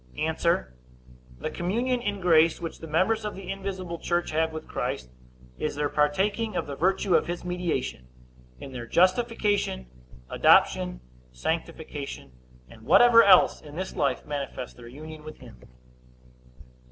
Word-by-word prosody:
A. -, -, 0 dB, 1.0 s
The -, -, -4 dB
communion 240 Hz, +8 st, -1 dB
in 205 Hz, -3 st, -3 dB
grace 165 Hz, -2 st, +4 dB
which 165 Hz, -1 st, -6 dB
the 165 Hz, -, -8 dB
members 190 Hz, +8 st, +1 dB
of 210 Hz, -, -4 dB
the 190 Hz, -1 st, -7 dB
invisible 190 Hz, -3 st, -5 dB
church 175 Hz, 0 st, -1 dB
have 160 Hz, +1 st, +1 dB
with 160 Hz, 0 st, -7 dB
Christ, 60 Hz, 0 st, -4 dB, 0.5 s
is 150 Hz, -, -2 dB
their 145 Hz, 0 st, -1 dB
partaking 195 Hz, +9 st, 0 dB
of -, -, -1 dB
the 140 Hz, -, -6 dB
virtue 190 Hz, +4 st, +1 dB
of 160 Hz, -, +3 dB
his 175 Hz, 0 st, -5 dB
mediation, 175 Hz, -, -3 dB, 0.5 s
in 135 Hz, -, -9 dB
their 120 Hz, -2 st, -7 dB
justification, 205 Hz, -, +1 dB, 0.4 s
adoption, -, -, +3 dB, 0.3 s
sanctification, 155 Hz, -, -5 dB, 0.4 s
and -, -, -15 dB
whatever 240 Hz, -1 st, +7 dB
else, 200 Hz, -, +6 dB
in 150 Hz, -1 st, -12 dB
this 185 Hz, +2 st, -5 dB
life, 135 Hz, -4 st, 0 dB
manifests 140 Hz, -3 st, -5 dB
their 120 Hz, -1 st, -12 dB
union 155 Hz, +4 st, -10 dB
with 155 Hz, 0 st, -10 dB
him. 60 Hz, -, -15 dB
165 Hz, 140 wpm, -26 LUFS, 145-195 Hz, 1.0 s, whatever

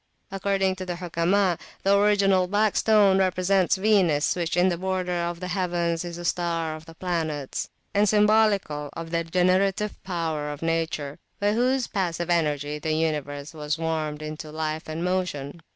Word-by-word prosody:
According 195 Hz, -1 st, 0 dB
to 185 Hz, -, -5 dB
the 175 Hz, -, -2 dB
Hukama, 175 Hz, +1 st, +1 dB, 0.2 s
the 195 Hz, +1 st, +4 dB
original 200 Hz, -2 st, +3 dB
Black 205 Hz, +2 st, +1 dB
Stone 205 Hz, -3 st, +4 dB
represents 185 Hz, 0 st, +2 dB
Venus, 190 Hz, -7 st, +2 dB
which 170 Hz, -1 st, -2 dB
in 180 Hz, +1 st, +4 dB
the 175 Hz, -, -1 dB
border 185 Hz, -1 st, -2 dB
of 170 Hz, -1 st, -2 dB
the 180 Hz, 0 st, -5 dB
heavens 175 Hz, -2 st, -1 dB
is 170 Hz, -1 st, -6 dB
a 175 Hz, -, -7 dB
star 165 Hz, -2 st, -1 dB
of 155 Hz, +1 st, -12 dB
the 165 Hz, -, -12 dB
planets, 160 Hz, -6 st, -3 dB, 0.2 s
and 205 Hz, 0 st, +3 dB
symbolical 210 Hz, -8 st, +3 dB
of 165 Hz, 0 st, -7 dB
the 170 Hz, -, +1 dB
[p.163] 165 Hz, -1 st, -6 dB
generative 190 Hz, +3 st, +1 dB
power 165 Hz, -5 st, -2 dB
of 145 Hz, +2 st, -7 dB
nature, 165 Hz, -3 st, -2 dB, 0.2 s
by 205 Hz, +1 st, +2 dB
whose 250 Hz, +2 st, +2 dB
passive 175 Hz, -4 st, -2 dB
energy 150 Hz, -3 st, 0 dB
the 155 Hz, +1 st, -1 dB
universe 150 Hz, -2 st, -2 dB
was 150 Hz, -1 st, -3 dB
warmed 155 Hz, -2 st, -2 dB
into 155 Hz, 0 st, -7 dB
life 155 Hz, 0 st, -3 dB
and 160 Hz, +2 st, -3 dB
motion. 175 Hz, -5 st, -2 dB
175 Hz, 170 wpm, -25 LUFS, 160-190 Hz, 0.2 s, the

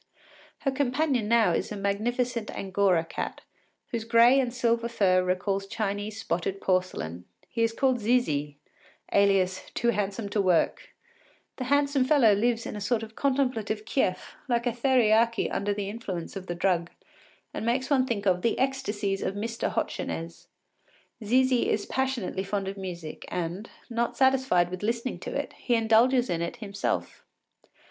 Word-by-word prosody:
Her 275 Hz, -, +1 dB
companion 265 Hz, -3 st, 0 dB
now 230 Hz, -1 st, +4 dB
is -, -, -1 dB
a 210 Hz, -, -4 dB
magnificent 230 Hz, +4 st, -1 dB
angora 190 Hz, -3 st, +1 dB
cat, -, -, -5 dB, 0.5 s
whose 230 Hz, -2 st, -3 dB
gray 235 Hz, +3 st, +5 dB
and 250 Hz, -3 st, 0 dB
silver 235 Hz, -1 st, 0 dB
fur 185 Hz, -5 st, +3 dB
recalls 195 Hz, +2 st, -1 dB
Chinese 205 Hz, +1 st, -3 dB
spotted 190 Hz, 0 st, -2 dB
porcelain. 180 Hz, -, -1 dB, 0.2 s
He 230 Hz, -, -3 dB
is 230 Hz, 0 st, +3 dB
called 260 Hz, +1 st, +1 dB
Zizi, 155 Hz, -, 0 dB, 0.6 s
alias 195 Hz, -2 st, +2 dB
“Too 235 Hz, -, +1 dB
Handsome 205 Hz, 0 st, -1 dB
to 205 Hz, 0 st, +1 dB
Work.” 180 Hz, -4 st, +1 dB, 0.6 s
The 255 Hz, -, -3 dB
handsome 285 Hz, 0 st, +2 dB
fellow 255 Hz, -6 st, +5 dB
lives 230 Hz, +3 st, +1 dB
in -, -, -5 dB
a 210 Hz, -, -6 dB
sort 225 Hz, +2 st, 0 dB
of 220 Hz, 0 st, -10 dB
contemplative 250 Hz, -6 st, 0 dB
kief, 220 Hz, -6 st, -1 dB
like 240 Hz, -1 st, 0 dB
a 245 Hz, -, +2 dB
theriaki 230 Hz, -2 st, +3 dB
under 205 Hz, +1 st, -1 dB
the 200 Hz, -1 st, -2 dB
influence 200 Hz, -6 st, -5 dB
of 190 Hz, -1 st, -7 dB
the 175 Hz, -, -3 dB
drug, 170 Hz, -1 st, +1 dB, 0.6 s
and -, -, -4 dB
makes 255 Hz, +4 st, 0 dB
one 260 Hz, -2 st, +3 dB
think 210 Hz, -5 st, -2 dB
of 180 Hz, -2 st, +2 dB
“The 230 Hz, -, +1 dB
Ecstasies 215 Hz, -7 st, -1 dB
of 195 Hz, -, -2 dB
Mr. 230 Hz, +3 st, -2 dB
Hochenez.” 165 Hz, 0 st, -4 dB, 0.8 s
Zizi 255 Hz, +3 st, +3 dB
is 210 Hz, -, 0 dB
passionately 260 Hz, -8 st, -2 dB
fond 195 Hz, 0 st, -2 dB
of 195 Hz, -, -4 dB
music, 175 Hz, -5 st, -7 dB
and, 180 Hz, +5 st, -4 dB, 0.2 s
not 235 Hz, -1 st, -2 dB
satisfied 260 Hz, -10 st, +3 dB
with 185 Hz, -, -5 dB
listening 230 Hz, +4 st, -2 dB
to -, -, -6 dB
it, -, -, -3 dB
he 245 Hz, -, +1 dB
indulges 235 Hz, +3 st, +4 dB
in 170 Hz, -4 st, -1 dB
it 170 Hz, -, -3 dB
himself. 200 Hz, -4 st, -3 dB
220 Hz, 155 wpm, -27 LUFS, 195-245 Hz, 0.8 s, gray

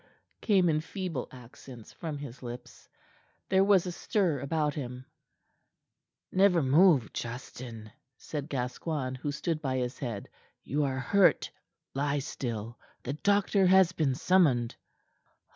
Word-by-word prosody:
came 195 Hz, -5 st, +3 dB
in 155 Hz, -2 st, +2 dB
feeble 175 Hz, -6 st, -4 dB
accents 125 Hz, -1 st, -13 dB
from 160 Hz, -4 st, -5 dB
his 135 Hz, -3 st, -9 dB
lips. 120 Hz, -1 st, -9 dB, 0.6 s
There 190 Hz, 0 st, +4 dB
was 195 Hz, -3 st, +4 dB
a 180 Hz, -, -3 dB
stir 175 Hz, -4 st, 0 dB
about 150 Hz, +2 st, 0 dB
him. 125 Hz, -2 st, -6 dB, 1.3 s
"Never 185 Hz, -4 st, +4 dB
move, 145 Hz, -, +4 dB
Justin," 120 Hz, -2 st, -7 dB, 0.3 s
said 150 Hz, -1 st, -6 dB
Gascoigne, 130 Hz, +1 st, -3 dB
who 145 Hz, -, -2 dB
stood 155 Hz, +2 st, -2 dB
by 130 Hz, -3 st, -1 dB
his 125 Hz, 0 st, -3 dB
head. 115 Hz, -7 st, -4 dB, 0.4 s
"You 145 Hz, +1 st, 0 dB
are 135 Hz, -1 st, -2 dB
hurt. 190 Hz, +9 st, +3 dB, 0.4 s
Lie 140 Hz, +1 st, 0 dB
still. 120 Hz, -5 st, -5 dB, 0.2 s
The 135 Hz, -, -3 dB
doctor 200 Hz, +3 st, +2 dB
has 190 Hz, -1 st, +6 dB
been 150 Hz, -7 st, 0 dB
summoned." 145 Hz, -8 st, +3 dB
145 Hz, 125 wpm, -29 LUFS, 125-175 Hz, 1.3 s, has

